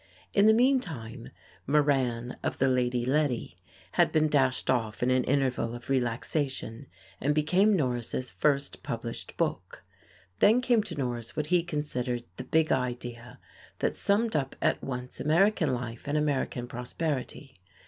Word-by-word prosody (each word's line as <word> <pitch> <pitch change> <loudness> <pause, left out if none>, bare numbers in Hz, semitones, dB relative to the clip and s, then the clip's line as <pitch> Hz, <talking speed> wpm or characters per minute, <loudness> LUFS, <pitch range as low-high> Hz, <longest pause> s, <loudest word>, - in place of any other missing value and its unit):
In 200 +1 +5
the 220 - +7
meantime 160 - 0 0.4
"Moran 130 -5 +1
of - - -2
the 135 - +3
Lady 125 -1 +1
Letty" 130 -8 0 0.3
had 175 - +3
been 155 -1 +3
dashed 135 -3 +2
off 115 -4 0
in 125 - +3
an 130 0 +3
interval 130 -4 0
of 120 +3 -7
relaxation, 130 0 -2 0.3
and 145 +2 +1
became 185 +8 +3
Norris' 125 -4 -2
first 140 -2 0
published - - -6
book. - - -2 0.6
Then 220 +4 +6
came 245 -3 +3
to 170 - -5
Norris 120 -4 -4
what 150 - -1
he 175 - +5
considered 130 -7 -3
"the - - -5
big 160 0 +2
idea," 120 -1 -3 0.4
that - - -1
summed 220 +3 +1
up 135 -3 -1
at - - +1
once 125 -1 -6
American 165 0 +3
life 120 +1 -5
and 145 +1 0
American 135 -4 -1
prosperity. 130 +2 -4
135 Hz, 145 wpm, -28 LUFS, 125-155 Hz, 0.6 s, the